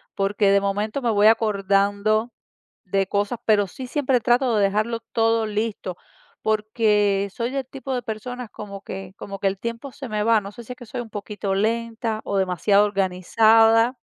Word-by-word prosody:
porque 195 0 +2
de 200 - +4
momento 210 +6 -2
me 235 - +1
voy 210 0 +4
acordando 210 +1 +2 0.5
de 195 +1 0
cosas, 205 +4 -1
pero 210 -2 +4
sí 255 +7 -8
siempre 265 -2 +1
trato 245 0 +2
de 205 - +3
dejarlo 215 +4 0
todo 225 0 +2
listo, 210 -4 -3 0.5
porque 210 -2 +1
soy 235 +1 -2
del 270 -2 -3
tipo 270 0 -6
de 245 - -2
personas 235 +2 -6
como 200 -2 -8
que 190 -1 -8
como 195 -1 -7
que 195 - +1
el 195 0 -1
tiempo 235 +4 -5
se 270 -4 -8
me 210 -1 -1
va. 225 -1 +4
No 200 0 -8
sé 240 +2 -11
si 250 - -6
es - - -20
que 245 - -11
soy 245 - -6
un 225 - -9
poquito 205 -1 -4
lenta 225 +1 -1
o 200 - -1
demasiado 195 +2 +3
organizada. 225 +5 +3
215 Hz, 185 wpm, -23 LUFS, 200-230 Hz, 0.5 s, de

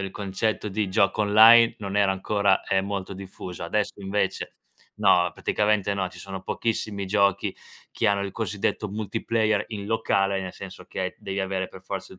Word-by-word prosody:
il 95 0 -4
concetto 100 +2 -2
di 105 0 -1
gioco 100 +2 +2
online 115 +3 +7
non 100 -1 -4
era 100 -1 +4
ancora, 100 0 +1
ehm, 95 0 +1
molto 100 -1 -4
diffuso. 95 -2 -8
Adesso, 105 +3 -2
invece 100 +1 -2 0.4
no, 90 0 +4
praticamente 105 -1 +1
no, 95 -2 -1
ci 90 0 -14
sono 95 +1 -7
pochissimi 105 -2 -2
giochi 100 -1 +1 0.4
che - - -1
hanno 100 -1 +2
il 100 -1 -4
cosiddetto 105 -1 -2
multiplayer 110 +1 0
in 100 -3 -6
locale, 100 -3 +1
nel 95 -1 -6
senso 95 -1 -10
che 95 0 -4
devi 100 0 -4
avere 95 -1 -2
per 95 - -13
forza 95 -1 -6
il 95 - -14
100 Hz, 170 wpm, -25 LUFS, 95-105 Hz, 0.4 s, online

